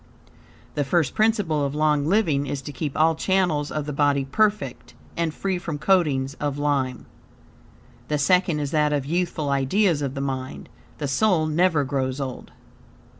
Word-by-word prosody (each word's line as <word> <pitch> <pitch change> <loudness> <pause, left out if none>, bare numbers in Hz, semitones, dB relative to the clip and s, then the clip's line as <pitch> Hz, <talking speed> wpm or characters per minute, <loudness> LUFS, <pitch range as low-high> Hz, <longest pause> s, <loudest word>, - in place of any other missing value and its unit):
The 145 - 0
first 145 +1 +1
principle 205 -9 +1
of 140 0 -2
long 150 -1 +2
living 160 -8 +2
is 135 0 -4
to 145 - -6
keep 145 -1 -4
all 160 +1 +4
channels 160 -4 0
of 150 -1 -3
the 150 - -4
body 140 -1 +2
perfect 205 - -1 0.2
and 165 -1 0
free 190 +3 -2
from 160 -4 -4
coatings 145 -7 +1
of 145 -1 -2
lime. 140 -3 -1 1.0
The 150 - 0
second 175 +1 +2
is 145 -1 -3
that 150 -1 +2
of 140 -2 -1
youthful 165 -2 -1
ideals 150 +5 +2
of 140 -1 -3
the - - -3
mind. 130 -1 -4 0.3
The 145 - -3
soul 160 +4 +2
never 160 -1 +2
grows 130 -1 -2
old. 130 -3 -6
150 Hz, 165 wpm, -24 LUFS, 140-170 Hz, 1.0 s, all